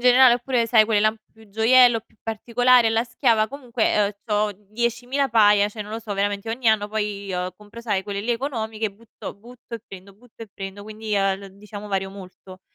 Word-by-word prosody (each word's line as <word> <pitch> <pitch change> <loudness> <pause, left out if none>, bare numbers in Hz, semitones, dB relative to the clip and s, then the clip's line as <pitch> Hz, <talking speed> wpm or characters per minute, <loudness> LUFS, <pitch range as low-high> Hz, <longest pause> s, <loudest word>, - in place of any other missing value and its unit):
generale, 250 0 +7
oppure 245 -1 0
sai 225 -1 +5
quelle 215 -1 +2
là 215 - +4
un 220 - -4
po' 215 - -39
più 220 -1 -19
gioiello, 230 +3 +5
più - - -33
particolare, 240 +2 +3
alla 225 +1 +1
schiava 230 -2 +2
comunque, 240 -6 0
uhm, 200 - -1
c'ho 210 -1 0 0.2
10.000 245 +4 -1
paia, 210 -3 +5
cioè, 210 0 -7
non 210 +1 -10
lo 225 - -4
so 215 -2 -6
veramente 200 +2 -2
ogni 235 +2 -4
anno, 210 -1 +2
poi, 205 -2 -3 0.2
compro 210 +3 -12
sai 205 -5 -1
quelle 200 0 -4
lì 225 +4 -3
economiche 225 -4 -3
e - - -5
butto 225 +2 -10
butto 240 +3 -12
e 230 - -6
prendo, 195 +1 -12
butto 230 +2 -15
e 225 - -10
prendo, 195 +1 -8
quindi, 215 0 -5
uhm, 195 -1 +2
l 195 -1 -13
diciamo 210 0 -9
vario 195 -1 -2
molto. 185 -1 -12
220 Hz, 210 wpm, -23 LUFS, 205-235 Hz, 0.2 s, generale